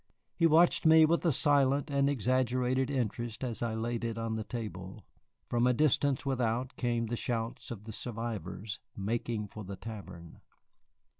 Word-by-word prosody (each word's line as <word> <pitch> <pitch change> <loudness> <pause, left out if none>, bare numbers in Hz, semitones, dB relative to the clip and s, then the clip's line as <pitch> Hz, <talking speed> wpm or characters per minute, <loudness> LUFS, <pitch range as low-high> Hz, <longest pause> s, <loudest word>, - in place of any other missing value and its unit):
He 165 - +4
watched 165 +2 +4
me 160 -1 +7
with 170 +2 +1
a - - +4
silent 140 0 +3
and 140 0 +2
exaggerated 130 0 +1
interest 120 -3 -2
as 120 -3 -3
I 115 -2 -1
laid 115 +1 -2
it 115 -1 -2
on 115 -1 -2
the 110 - -3
table. 105 -4 -7 0.4
From 120 +1 +2
a 125 - +4
distance 145 -1 +2
without 125 -1 -1
came 120 -2 0
the 115 +2 -2
shouts 115 -1 -3
of 105 -3 -7
the 110 - -7
survivors 110 -3 -5 0.2
making 110 +1 -2
for 110 - -8
the 100 +1 -6
tavern. 95 -5 -9
120 Hz, 160 wpm, -31 LUFS, 110-130 Hz, 0.4 s, me